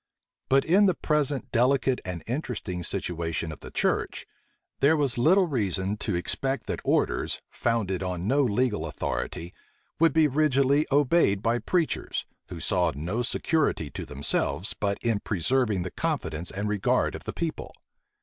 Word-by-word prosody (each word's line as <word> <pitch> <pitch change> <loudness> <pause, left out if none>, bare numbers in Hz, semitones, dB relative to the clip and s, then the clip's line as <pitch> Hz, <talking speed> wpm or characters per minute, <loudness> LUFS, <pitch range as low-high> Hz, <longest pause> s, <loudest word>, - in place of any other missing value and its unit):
But 135 +1 +4
in 195 +5 +5
the 185 - +2
present 150 -4 -1
delicate 130 +1 +2
and 90 -3 -5
interesting 115 - -3
situation 80 -1 -3
of 75 - -9
the - - -10
church, - - -1 0.5
there 155 +3 +4
was 140 -5 +1
little 185 +9 +5
reason 100 - -1
to 90 - -2
expect 135 +8 -1
that - - -3
orders, - - +1
founded 105 -6 -1
on 90 0 -3
no 140 +5 +3
legal 115 - +1
authority, 85 +3 -4 0.5
would 165 -1 +5
be 160 +1 +4
rigidly 140 0 +3
obeyed 140 -8 +3
by 115 +1 +2
preachers, 170 +2 -1 0.2
who 85 - -7
saw 90 -2 +1
no 90 - -2
security 125 - 0
to - - -5
themselves 70 +7 -1
but 100 -1 -1
in 115 -3 +1
preserving 105 +1 0
the 90 - -5
confidence 80 +2 -2
and 100 +2 -3
regard 105 -2 +1
of - - -8
the - - -4
people. 165 -2 -4
115 Hz, 150 wpm, -27 LUFS, 90-140 Hz, 0.5 s, in